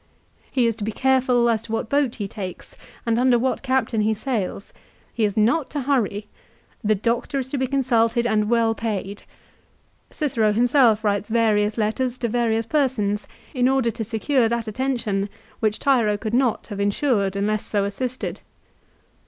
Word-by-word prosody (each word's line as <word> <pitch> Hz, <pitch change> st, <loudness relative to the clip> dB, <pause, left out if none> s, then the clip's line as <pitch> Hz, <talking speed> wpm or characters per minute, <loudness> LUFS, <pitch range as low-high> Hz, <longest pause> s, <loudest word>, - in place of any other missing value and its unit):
He 255 Hz, -3 st, +2 dB
is 230 Hz, -, +2 dB
to 215 Hz, -, -5 dB
be 220 Hz, -, -2 dB
careful 255 Hz, -1 st, +2 dB
as 225 Hz, -2 st, +1 dB
to 225 Hz, -, -10 dB
what 225 Hz, +1 st, -1 dB
boat 280 Hz, -2 st, +1 dB
he 205 Hz, -3 st, -4 dB
takes, 190 Hz, -3 st, -8 dB, 0.3 s
and 230 Hz, 0 st, +1 dB
under 250 Hz, -1 st, +4 dB
what 255 Hz, +2 st, -1 dB
captain 260 Hz, -4 st, 0 dB
he 215 Hz, +1 st, +1 dB
sails. 210 Hz, -5 st, -3 dB, 0.4 s
He 225 Hz, -, +1 dB
is 205 Hz, 0 st, -2 dB
not 250 Hz, +8 st, +2 dB
to 290 Hz, -, -3 dB
hurry. 235 Hz, -7 st, 0 dB, 0.6 s
The 215 Hz, 0 st, +3 dB
doctor 235 Hz, +7 st, -1 dB
is 260 Hz, -1 st, -3 dB
to 280 Hz, -, -2 dB
be 260 Hz, -, 0 dB
consulted 240 Hz, -3 st, +1 dB
and 215 Hz, -2 st, +1 dB
well 230 Hz, -1 st, +3 dB
paid. 205 Hz, -3 st, -4 dB, 0.9 s
Cicero 230 Hz, -8 st, 0 dB
himself 235 Hz, -1 st, +4 dB
writes 205 Hz, 0 st, 0 dB
various 215 Hz, -2 st, +2 dB
letters 240 Hz, +3 st, -1 dB
to 240 Hz, -, -1 dB
various 230 Hz, -1 st, 0 dB
persons 225 Hz, -7 st, 0 dB, 0.3 s
in 250 Hz, -2 st, +2 dB
order 265 Hz, -3 st, +2 dB
to 225 Hz, -, -4 dB
secure 230 Hz, +3 st, +1 dB
that 235 Hz, -1 st, -2 dB
attention 215 Hz, -4 st, -1 dB, 0.3 s
which 215 Hz, -1 st, +1 dB
Tiro 235 Hz, -7 st, +2 dB
could 215 Hz, +1 st, -5 dB
not 250 Hz, -2 st, +1 dB
have 205 Hz, -2 st, -6 dB
insured 200 Hz, -1 st, +1 dB
unless 205 Hz, +1 st, 0 dB
so 205 Hz, -2 st, -1 dB
assisted. 250 Hz, +5 st, -4 dB
230 Hz, 170 wpm, -23 LUFS, 210-255 Hz, 0.9 s, under